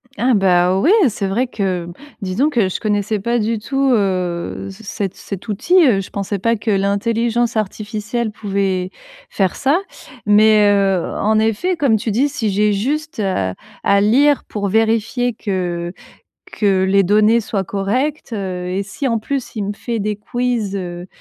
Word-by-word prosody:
Ah 255 0 +2
bah 185 -2 +3
ouais! 310 - +3 0.2
C'est 200 -2 -3
vrai 235 +7 0
que 185 -7 -2 0.3
disons 200 +10 +1
que 230 -10 +1
je - - -3
connaissais 210 0 0
pas 235 +4 0
du 220 +1 -1
tout, 270 +4 0
heu, 185 -5 -1
c 195 +3 -14
cet 200 -2 -4
cet 195 +2 -8
outil, 230 - 0
heu, 210 -6 +3
je 190 - -9
pensais 200 0 -3
pas 230 +4 +1
que 215 +1 -2
l'intelligence 230 +4 0
artificielle 215 +2 -3
pouvait 195 -3 -1 0.4
faire 190 - 0
ça. 285 +5 +2 0.5
Mais, 210 0 +5
heu, 195 -3 +2
en 215 +1 +2
effet, 225 - +1
comme 275 -9 +2
tu 220 +1 -2
dis, 260 +8 +2
si 240 -7 -2
j'ai 210 +1 +2
juste, 300 +8 -2
heu, 185 - -1 0.3
à 200 0 +4
lire 275 +8 +4
pour 205 -2 -3
vérifier 225 +3 +1
que 180 -5 -3 0.6
que 195 -3 +2
les 195 +1 +3
données 215 +4 +4
soient 200 -3 -2
correctes, 240 - -2
heu 185 -4 -4
et 190 +2 -1
si 200 +8 -5
en 230 -2 +1
plus 270 +3 -4
il 215 -3 -2
me 200 - -2
fait 230 +2 -4
des 210 +1 -2
quiz, 230 -2 -2
heu 175 -2 -6
210 Hz, 170 wpm, -18 LUFS, 195-235 Hz, 0.6 s, Mais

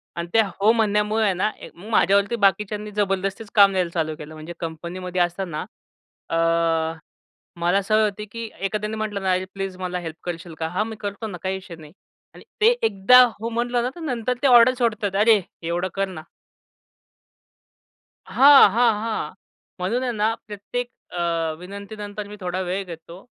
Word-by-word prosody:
आणि 170 0 -4
ते 225 - +6
हो 200 +2 +2
म्हणण्यामुळे 215 0 +1
आहे 200 - +2
ना 185 +4 0 0.2
मग 200 +6 -12
माझ्यावरती 200 +1 +3
बाकीच्यांनी 210 +1 0
जबरदस्तीच 195 +1 -2
काम 200 -2 +7
द्यायला 180 -2 0
चालू 160 -2 -1
केलं. 150 +1 -9
म्हणजे 155 +2 -8
कंपनीमध्ये 175 +2 -4
असताना 175 -2 -2 0.6
अ, 165 - 0 1.2
मला 175 +4 +2
सवय 215 +2 +2
होती 210 0 -2
की 230 0 -6
एखाद्याने 210 +2 -2
म्हटलं 210 -2 -3
ना, 190 -1 +1
"अरे 185 +1 -1
प्लीज 195 -1 -5
मला 180 -1 -3
हेल्प 165 -2 -6
करशील 170 -1 -6
का?" 160 - -1
"हां, 195 +5 -1
मी 225 - -6
करतो 205 +1 -5
ना 190 -4 -7
काही 190 0 -1
इश्यू 185 -3 -11
नाही." 155 -1 -13 0.4
आणि - - -13 0.2
ते 435 - +6 0.2
एकदा 220 +5 +6 0.2
हो 230 +2 -3
म्हणलं 240 +1 0
ना 250 - 0
तर - - -10
नंतर 250 -5 -1
ते 280 - +3
ऑर्डर 245 0 +7
सोडतात, 210 -5 0
"अरे! 220 -2 +5 0.2
एवढं 170 +2 -1
कर 195 0 0
ना." 180 -5 -8 2.0
हां, 275 -4 +8
हां, 230 +2 +4
हां. 225 -1 -3 0.5
म्हणून 225 +8 -1
आहे 250 - -1
ना 220 0 +1
प्रत्येक 215 +4 -5 0.2
अ, 170 -2 -1
विनंतीनंतर 205 +2 -7
मी 205 - -9
थोडा 180 -1 -3
वेळ 185 +2 -2
घेतो 170 +2 -11
200 Hz, 170 wpm, -23 LUFS, 180-220 Hz, 2.0 s, हां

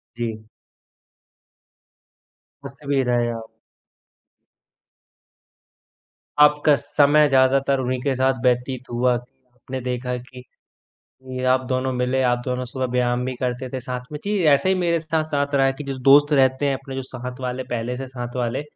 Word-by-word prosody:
जी। 115 -2 -4 2.3
मस्ती 140 +1 -11
में 135 -2 +2
रहे 120 -1 +1
आप। 115 -1 -7 2.9
आपका 150 0 +5
समय 145 +1 +3
ज़्यादातर 135 0 +3
उन्हीं 130 0 -1
के 135 0 0
साथ 130 0 +1
व्यतीत 125 +1 0
हुआ 125 +1 +2
कि 125 +1 -16
आपने 130 +1 -7
देखा 125 0 -3
कि 125 +1 -12 0.9
ये 130 - -3
आप 130 - +2
दोनों 130 0 -1
मिले, 125 +1 0
आप 120 -1 +2
दोनों 125 0 -2
सुबह 130 +1 -3
व्यायाम 125 0 +1
भी 130 - -3
करते 125 +1 -2
थे 130 - -3
साथ 125 0 -5
में। 150 - -4
जी, 210 +1 0 0.2
ऐसे 140 - 0
ही 190 - +4
मेरे 170 -2 +1
स्थ 160 0 -7 0.2
साथ 145 0 -1
रहा 135 -1 +4
कि 150 - -6
जो 135 -1 -4
दोस्त 145 +2 +6
रहते 130 0 +3
हैं 140 - +1
अपने 135 0 -9
जो 135 - -3
साथ 125 0 -8
वाले, 125 0 -3
पहले 120 +1 -2
से 135 +1 -6
साथ 125 -1 -7
वाले, 125 +2 -1
130 Hz, 160 wpm, -22 LUFS, 125-140 Hz, 2.9 s, दोस्त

